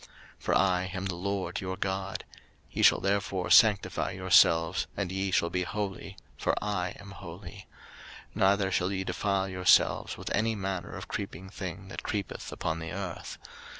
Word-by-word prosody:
03:011:044 - - -17 0.4
For - - +2
I 95 -1 +2
am 95 +1 -3
the 95 -2 -2
LORD 95 -1 -2
your 95 0 -4
God: 95 +1 -3 0.5
ye - - -2
shall - - +6
therefore 95 -1 0
sanctify 105 -4 +5
yourselves, 85 +2 +4
and 95 -3 -2
ye 95 +1 -1
shall 85 -2 +1
be 90 0 0
holy; 95 0 -4 0.2
for - - +1
I 95 -4 -2
am 100 0 -11
holy: 95 +1 -10 0.7
neither 95 -1 +3
shall 90 +1 +1
ye 95 -1 -1
defile 100 0 0
yourselves 90 -1 +3
with - - -5
any 110 +2 +1
manner 95 -3 -4
of - - -7
creeping 95 +4 -5
thing 95 0 -6
that - - -6
creepeth 105 -2 -4
upon 80 - -2
the 80 0 -6
earth. 90 -2 -5
95 Hz, 165 wpm, -29 LUFS, 90-100 Hz, 0.7 s, shall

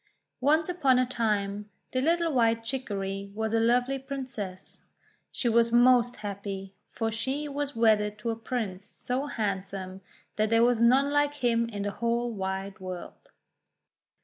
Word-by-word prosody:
Once 310 +4 +3
upon 300 -8 +3
a 255 - +3
time, 210 -4 -1 0.2
the 255 - 0
little 335 +2 +2
White 230 -2 +2
Chicory 200 -6 -3
was 220 0 -2
a 225 - +3
lovely 245 +4 +2
Princess. 255 -9 -6 0.5
She 245 - -1
was 230 0 +4
most 245 0 +5
happy, 200 -2 -6 0.2
for 225 -1 -2
she 270 +6 -2
was 285 0 -3
wedded 210 -2 +3
to 230 +2 -2
a - - -2
Prince 220 -5 -4
so 255 +7 -4
handsome 195 -5 -4 0.4
that 215 0 +2
there 230 +1 +4
was 240 -1 +3
none 265 +4 +5
like 290 0 +2
him 235 -4 +1
in 205 -3 -4
the 205 - -2
.whole 235 +2 -1
wide 195 -1 -4
world. 185 -1 -8
230 Hz, 150 wpm, -28 LUFS, 205-255 Hz, 0.5 s, most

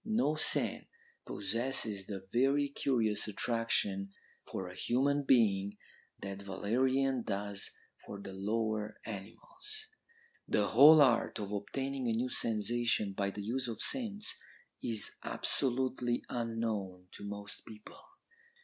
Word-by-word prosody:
No 220 -7 +1
scent 155 - +2 0.4
possesses 110 -2 -1
the 95 -2 -7
very 140 +3 +3
curious 115 -7 0
attraction 105 -3 0 0.4
for 95 - -4
a 90 - -8
human 140 +9 +1
being 105 -6 +3 0.5
that 100 0 -5
valerian 130 +7 0
does 100 -2 -4 0.3
for 100 - -8
the 100 -1 -8
lower 110 +2 -2
animals.' 345 - -6 0.6
"'The 105 -1 +2
whole 150 +6 +9
art 120 -4 +2
of 100 -1 -5
obtaining 130 +6 -3
a 115 - +1
new 120 +3 -1
sensation 115 -2 +1
by 100 0 -1
the 100 +1 -6
use 125 +4 -2
of 115 - -5
scents 215 -5 0 0.4
is 110 -3 +1
absolutely 125 -2 +2
unknown 110 -6 -3
to - - -10
most 100 0 -6
people. 110 -1 -12
115 Hz, 120 wpm, -33 LUFS, 100-130 Hz, 0.6 s, whole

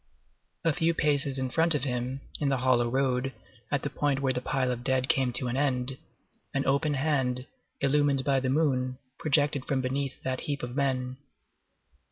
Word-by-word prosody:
A 165 - +4
few 165 0 +1
paces 140 -3 +1
in 130 -1 -2
front 165 +2 +4
of 145 - -1
him, 125 0 -2 0.2
in 145 - +1
the 135 - +2
hollow 120 -2 +2
road, 130 0 0 0.4
at 145 -2 0
the 145 - -1
point 140 -1 0
where 135 -1 +1
the 125 - -2
pile 130 -1 0
of 120 -1 -4
dead 130 0 +1
came 130 -2 +2
to 125 - +1
an 120 - -2
end, 130 -2 +1 0.6
an 135 - +1
open 145 +2 +2
hand, 130 -3 0 0.4
illumined 140 -1 +2
by 135 -1 +2
the 130 0 -1
moon, 130 -3 +1 0.2
projected 145 -3 +2
from 135 - 0
beneath 135 +1 -2
that 130 0 -1
heap 145 -2 -3
of 120 0 -5
men. 130 -2 0
135 Hz, 185 wpm, -28 LUFS, 130-145 Hz, 0.6 s, A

